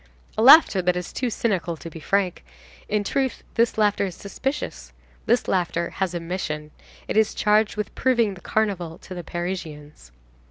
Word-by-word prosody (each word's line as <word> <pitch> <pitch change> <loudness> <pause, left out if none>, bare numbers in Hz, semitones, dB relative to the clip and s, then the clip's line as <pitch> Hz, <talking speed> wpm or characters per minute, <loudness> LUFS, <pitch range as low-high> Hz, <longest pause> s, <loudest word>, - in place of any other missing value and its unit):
A - - 0
laughter 260 - +8
that 180 0 +1
is 180 -1 -5
too 255 - -1
cynical 185 -7 -1
to 165 - -9
be 165 0 -9
frank. 190 +2 0 0.5
In 210 -1 +1
truth, 265 +4 -1
this 230 -1 +1
laughter 210 -2 +2
is 180 - -7
suspicious. 195 - -5 0.3
This - - +2
laughter 170 -2 0
has 185 -2 -2
a - - -1
mission. 155 -3 -4 0.4
It - - -2
is 220 -1 +3
charged 210 0 +2
with 210 -1 -4
proving 235 -5 +2
the 180 - -13
Carnival 185 -7 -1
to 185 - -10
the 175 -1 -6
Parisians. 160 - -6
190 Hz, 170 wpm, -24 LUFS, 170-215 Hz, 0.5 s, laughter